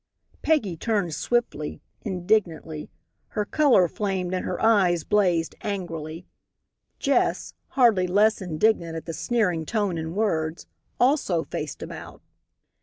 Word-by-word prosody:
Peggy 250 - +1
turned 200 -4 0
swiftly, 235 -8 -1 0.2
indignantly. 175 -5 -1 0.4
Her 210 - -2
color 260 - +4
flamed 185 -1 -2
and 185 - -1
her - - -3
eyes 190 -7 +3
blazed 180 -6 +2
angrily. 165 -5 -5 0.7
Jess, - - +1 0.2
hardly 220 -8 +5
less 210 +4 +3
indignant 170 -1 +1
at 160 - -6
the 165 - -5
sneering 180 -6 0
tone 200 -1 -1
and 160 +2 -5
words, 165 -7 -1 0.3
also 245 - +2
faced - - -5
about. - - -9
185 Hz, 115 wpm, -25 LUFS, 165-215 Hz, 0.7 s, hardly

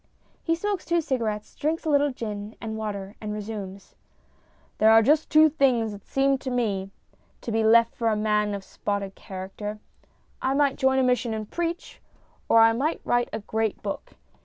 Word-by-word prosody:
[He 330 - +1
smokes 400 +2 -2
two 345 0 +1
cigarettes, 225 -8 -2
drinks 320 +3 -2
a - - 0
little 290 0 +4
gin 210 -3 -6
and 220 -1 -5
water, 205 -2 -5
and 210 -1 -4
resumes 205 -2 -7 0.4
:] - - -36
There 220 - +6
are 225 0 +7
just 300 +6 +3
two 310 0 +7
things 260 -7 +2
that 205 -1 -11
seem 270 0 +2
to 260 - -5
me 210 -6 -1 0.5
to 235 - -5
be 225 0 +1
left 230 +1 +5
for 230 - -2
a 220 - +2
man 210 -1 +1
of 200 - -7
spotted 200 0 -4
character. 195 +3 -7 0.6
I 265 +1 +1
might 280 -1 +2
join 265 0 +2
a 265 - +3
mission, 250 -2 +1
and 215 -1 -5
preach; 340 0 -4 0.5
or 225 - +7
I 225 0 +6
might 285 +8 -1
write 240 0 +1
a 220 - -4
great 220 0 -2
book. 200 - -5
225 Hz, 185 wpm, -25 LUFS, 210-270 Hz, 0.6 s, are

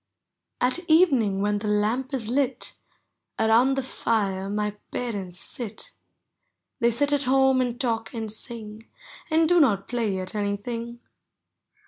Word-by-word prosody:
At 255 +7 +1
evening 265 - +4
when 205 0 +1
the 210 - -4
lamp 215 +6 0
is 255 -6 -2
lit. 260 +1 -1 0.6
Around 235 +5 +4
the 265 -1 -2 0.2
lire 195 -4 0
my 210 0 -1 0.2
parents 195 -7 -4
sit; 230 -5 -5 0.9
They 235 - +4
sit 285 +5 +1
at 285 -1 +1
home 265 0 +4
and 245 -1 -2
talk 225 -3 -1
and 225 -3 -4
sing. 220 0 -6 0.4
And 320 0 +3
do 355 +1 +4
not 205 - +3
play 225 -5 -1
at 185 +1 -5
anything. 230 +3 -3
230 Hz, 135 wpm, -25 LUFS, 210-260 Hz, 0.9 s, evening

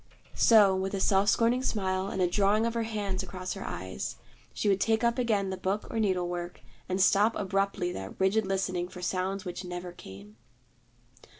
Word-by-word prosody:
So, 205 -4 +6
with 190 +1 -2
a - - -2
self 195 +1 +3
scorning 235 +2 +3
smile 190 -6 -1
and 190 -2 -1
a - - +4
drawing 205 +4 +2
of 230 - -1
her 230 - -1
hand 200 -4 -2
across 185 0 -5
her 195 - -7
eyes, 90 -7 -5 0.4
she - - -2
would 195 -1 +2
take 225 +1 +2
up 235 +2 +2
again 205 -5 +1
the 190 - -4
book 190 +3 -2
or 225 - -2
needle 185 -4 +1
work, 175 0 -5 0.3
and 185 +1 -1
stop 200 +4 +4
abruptly 195 -2 -1
that 95 - -7
rigid 195 +2 +2
listening 185 -2 -1
for 180 0 -10
sounds 190 +2 -2
which 180 +1 -5
never 180 0 -6
came. 100 - -12
190 Hz, 190 wpm, -29 LUFS, 180-205 Hz, 0.4 s, So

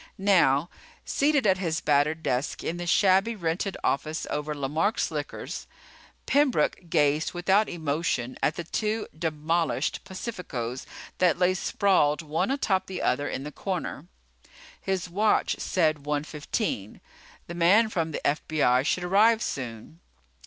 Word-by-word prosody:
Now, 175 -6 +3 0.3
seated 285 -2 +2
at 190 -2 +3
his 165 -4 -1
battered 150 +2 +1
desk 125 +3 -1
in 170 - -3
the 175 0 -5
shabby 195 +5 +3
rented 180 +1 -2
office 155 +3 -1
over 150 +1 -2
Lemark's 155 - 0
Liquors, - - -5 0.6
Pembroke 270 - +1
gazed 150 -1 +2
without 190 +4 +2
emotion 150 -6 -2
at 150 - +1
the 175 - -4
two 215 +6 -2
demolished 160 +1 -1
Pacificos 145 - -5 0.3
that 180 -3 +3
lay 180 +1 +3
sprawled 180 -5 +2
one 155 +8 -1
atop 195 -9 0
the 190 - -5
other 145 - +1
in 135 - -4
the 150 - -6
corner. 175 -3 -4 0.7
His 190 -2 -2
watch 210 +5 +1
said 155 -5 +1
one 150 -1 0
fifteen. 150 - -3 0.5
The 170 - -7
man 180 +7 +4
from 165 -7 -1
the - - -4
FBI 145 -4 +2
should 185 - 0
arrive 215 +5 +4
soon. 125 +4 -6
170 Hz, 135 wpm, -27 LUFS, 150-190 Hz, 0.7 s, man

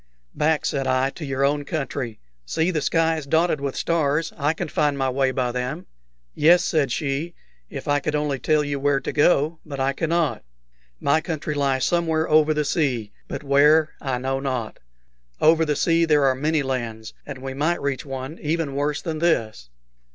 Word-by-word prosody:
"Back," 155 0 +1
said 135 -2 -1
I, 130 +1 +1
"to 160 - -9
your 135 -1 0
own 145 +1 +1
country. 140 -6 -4 0.2
See, 160 - 0
the 155 -4 -1
sky 165 +2 +2
is 150 -3 -6
dotted 160 0 +2
with 140 -1 -3
stars: 160 -1 0
I 145 0 +1
can 175 +1 -4
find 145 -1 0
my 135 -1 0
way 135 0 +1
by 130 -2 -1
them." 125 +7 -4 0.5
"Yes," 175 +3 +5
said 150 -7 +1
she, 150 +5 -2 0.3
"if - - -7
I 145 0 +2
could 150 +2 -2
only 150 -2 -1
tell 150 +4 +2
you 145 -1 -3
where 140 0 +2
to - - -4
go; 155 +1 +2
but 140 -3 -7
I 135 +1 +1
cannot. 165 - 0 0.6
My 155 +3 +2
country 155 -3 -3
lies 135 -3 +1
somewhere 165 -2 +1
over 155 0 +4
the 150 -1 0
sea, 130 -9 0 0.2
but - - -6
where, 150 +3 +4
I 135 -4 -1
know 135 +1 -2
not. 130 -5 -3 0.6
Over 160 +1 +4
the 150 -1 0
sea 165 +2 +2
there 150 -3 +3
are 135 - +4
many 150 +3 0
lands, 115 -4 -4
and 145 -2 -7
we 135 +1 -6
might 155 +6 0
reach 140 -2 -2
one 135 +3 -6
even 155 -2 -1
worse 145 +1 -1
than 160 -3 -3
this." 110 - 0
145 Hz, 190 wpm, -23 LUFS, 135-160 Hz, 0.6 s, Yes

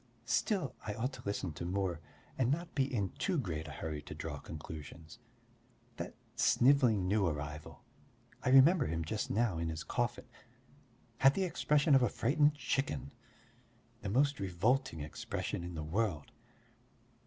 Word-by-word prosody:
Still, 185 - 0
I 105 -1 -4
ought 125 +5 -2
to - - -9
listen 100 -4 -2
to 85 - -6
more 90 -1 -1 0.4
and 125 -2 +1
not 170 +5 -1
be 135 -1 +1
in 100 -7 0
too 185 -3 +1
great 80 - -3
a - - -7
hurry 75 +1 -5
to - - -9
draw - - -5
conclusions. 80 +5 -9 0.8
That - - -5 0.2
snivelling 120 -8 +4
new 100 -1 +2
arrival 75 0 -5 0.6
I - - 0
remember 135 +6 +6
him 80 +1 -2
just 105 +7 -2
now 110 -7 +1
in 85 0 -1
his 80 -1 -4
coffin - - -2 0.9
had 135 +1 +6
the 195 - +1
expression 150 -4 +2
of 135 - +7
a 125 - +3
frightened 145 +7 +2
chicken, 140 -1 -2 0.9
the 100 - -3
most 140 +6 +2
revolting 100 - 0
expression 75 +3 -4
in 90 0 -6
the 80 - -4
world! 85 -2 -1
105 Hz, 155 wpm, -34 LUFS, 80-135 Hz, 0.9 s, of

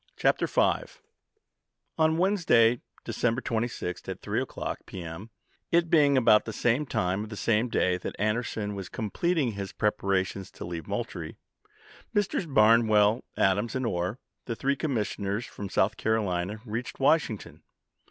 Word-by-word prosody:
p. - - +1
122. - - +1 1.0
N 160 0 +3
Wednesday, 165 - +3 0.2
December 120 0 0
26, 115 -7 -3
at - - -5
3 - - -1
o'clock - - -4
p. 90 - -7
m., 85 +7 -8 0.4
it 170 -1 +2
being 145 -4 +5
about 110 -4 +5
the 110 - -4
same 120 +6 +1
time 95 -1 0
of 110 - -8
the 110 - -6
same 115 +3 +1
day 90 -4 +2
that - - -5
Anderson 105 -1 -1
was 95 -2 -6
completing 135 - 0
his 100 -2 -5
Commis. - - -26
tL°enpres£ - - -47
preparations 95 -2 0
to - - -9
leave 85 -3 -6
Moultrie, - - -4 0.8
Messrs. 200 -3 0
Barnwell, 110 -3 +5 0.2
(ITi86iau' - - +2
Adams, 100 +6 +1
and 130 -1 -1
Orr, 90 +1 -1 0.3
the 115 - -3
three 140 +4 0
commissioners 110 -6 -2
from 100 -1 -7
South 95 +2 +1
Carolina, 105 -2 -1
reached 115 +2 -5
Washington. 140 -6 +1
110 Hz, 150 wpm, -28 LUFS, 100-130 Hz, 1.0 s, being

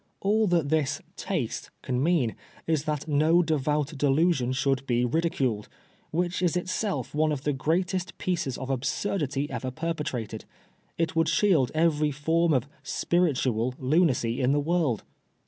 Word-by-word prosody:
All 215 +2 +2
that 170 -5 +2
this 155 -3 +1
* - - -41 0.2
taste - - -2
^ - - -20
can 125 -1 -1
mean 150 -7 +2 0.3
is 160 -2 0
that 150 0 -2
no 155 +4 +4
devout 150 -1 0
delusion 140 -1 +2
should 135 0 0
be 120 0 +2
ridiculed, 130 -7 0 0.4
which 175 +2 -1
is 180 -2 +2
itseU 185 +3 -2
one 155 +1 +2
of 145 -2 -3
the 145 - +1
greatest 175 +6 -1
pieces 175 -8 -2
of 135 0 -4
absurdity 140 +2 -1
ever 130 - -3
perpetrated. 130 -7 -4 0.5
It 165 -1 -1
would 165 -1 +3
shield 165 -7 +3
every 155 -2 +2
form 160 +4 +1
of 130 -2 +1
' - - -31 0.2
spiritual 130 -8 +1
' - - -25
lunacy 130 -5 +2
in 130 +2 +3
the 145 - +2
world. 155 -6 0
150 Hz, 160 wpm, -27 LUFS, 130-170 Hz, 0.5 s, no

